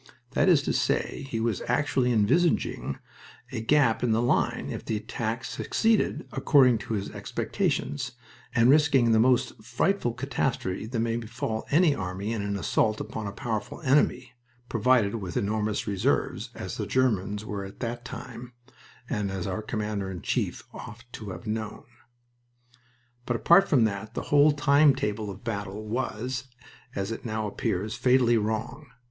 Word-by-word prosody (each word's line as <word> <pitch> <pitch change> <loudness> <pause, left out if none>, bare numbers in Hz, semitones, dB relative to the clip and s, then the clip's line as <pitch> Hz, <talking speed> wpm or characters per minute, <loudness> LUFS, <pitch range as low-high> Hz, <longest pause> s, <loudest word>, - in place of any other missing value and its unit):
That - - +3
is - - +5
to - - 0
say, - - -1
he 115 - -2
was 110 -3 -1
actually 125 0 +1
envisaging 120 - +1 0.5
a - - -3
gap 125 -1 +3
in 120 -2 +2
the 110 - +2
line 120 - +1
if - - -5
the 110 - -2
attack 115 +3 -3
succeeded 225 +6 0
according 135 -4 +4
to 110 - -3
his 100 -1 -4
expectations, 70 - -2 0.4
and 115 - +5
risking 135 -4 +5
the 110 - +5
most 120 -2 +2
frightful 155 - 0
catastrophe 120 -6 -2
that 115 0 -3
may 115 0 0
befall 115 -1 -4
any 160 +1 +4
army 95 +1 -3
in 110 - -2
an 100 0 -2
assault 105 +5 +1
upon 110 -2 -5
a - - -4
powerful 110 +1 -4
enemy, 130 -2 +2 0.4
provided 115 -2 +3
with 95 +2 -4
enormous 110 -1 -1
reserves, 100 -3 0
as - - -6
the - - -3
Germans 105 -5 0
were 100 -2 -4
at 95 - -10
that 120 0 -3
time, 125 0 -8 0.5
and 105 -1 -1
as 95 -2 -4
our 95 +3 -2
Commander 105 -3 -3
in 90 -3 -7
Chief - - -1
ought 115 +2 -9
to 105 -3 -7
have 90 0 -8
known. 110 -1 -4 1.4
But 120 - 0
apart 170 - +5
from 130 -6 +4
that 110 0 -2
the - - -2
whole 145 +1 +7
time 145 0 +4
table 105 -4 -2
of 95 - -6
the - - -22
battle 105 -2 -4
was, 125 +2 -3 0.5
as 100 +2 -2
it 115 - -5
now 110 -2 -2
appears, 105 0 -2
fatally 125 -2 +3
wrong. 110 +7 -3
115 Hz, 160 wpm, -27 LUFS, 105-130 Hz, 1.4 s, whole